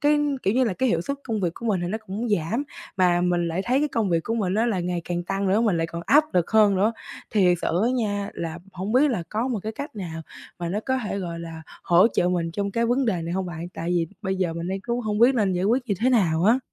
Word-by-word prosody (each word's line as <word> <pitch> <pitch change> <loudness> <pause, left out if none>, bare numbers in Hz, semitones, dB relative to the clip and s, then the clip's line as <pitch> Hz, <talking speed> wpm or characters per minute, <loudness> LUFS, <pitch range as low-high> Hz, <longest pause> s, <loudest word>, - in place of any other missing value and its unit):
cái, 295 +1 +4 0.2
kiểu 195 - +1
như 255 +1 +4
là, 225 - 0
cái 260 +5 +1
hiệu 165 - +1
suất 280 +11 -3
công 220 -4 -2
việc 175 -3 -1
của 235 - -7
mình 200 -5 +1
thì 175 - -2
nó 220 - -2
cũng 220 +5 -3
giảm, 205 - 0 0.3
mà 175 -2 +3
mình 175 -1 +1
lại 170 +3 -2
thấy 255 +3 +2
cái 300 - +1
công 220 -7 0
việc 165 -1 +2
của 225 - -1
mình 195 -5 0
á 225 +3 +2
là 210 -6 0
ngày 175 -1 -2
càng 175 0 -2
tăng 195 +1 -1
nữa, 200 +4 +3
mình 210 -7 +2
lại 165 - 0
còn 170 +1 -6
áp 300 +2 +6
lực 175 -2 +2
hơn 215 -2 +5
nữa. 210 +4 +2 0.4
Thiệt 180 -5 +3
sự 170 - +1
á 245 - +2
nha, 205 -4 -1
là 165 0 -4
hổng 190 +4 -4
biết 275 +3 +4
là 210 -9 -1
có 225 +5 -1
một 240 - -1
cái 220 - -4
cách 285 +2 -7
nào 165 -5 -5 0.4
mà 170 -1 -3
nó 195 +5 -1
có 260 0 +1
thể, 200 - -3
gọi 170 -3 -5
là, 165 -1 -8 0.2
hỗ 175 +5 +5
trợ 175 - +1
mình 175 -2 0
trong 200 +3 -2
cái 230 +3 0
vấn 245 +2 +1
đề 180 -6 0
này 165 +1 -4
hông 190 0 -1
bạn? 170 0 -6
Tại 170 +1 -3
vì 170 -2 +1 0.2
bây 190 -2 -1
giờ 185 -3 0
mình 170 +1 -4
đang 190 +1 -2
cũng 235 +4 -2
hông 210 -3 -2
biết 245 +4 +6
nên 205 -5 +2
giải 180 +1 -1
quyết 240 +6 +2
như 200 - +2
thế 250 +3 +3
nào 175 -9 +2
á. 225 +5 +5
195 Hz, 295 wpm, -24 LUFS, 175-230 Hz, 0.4 s, áp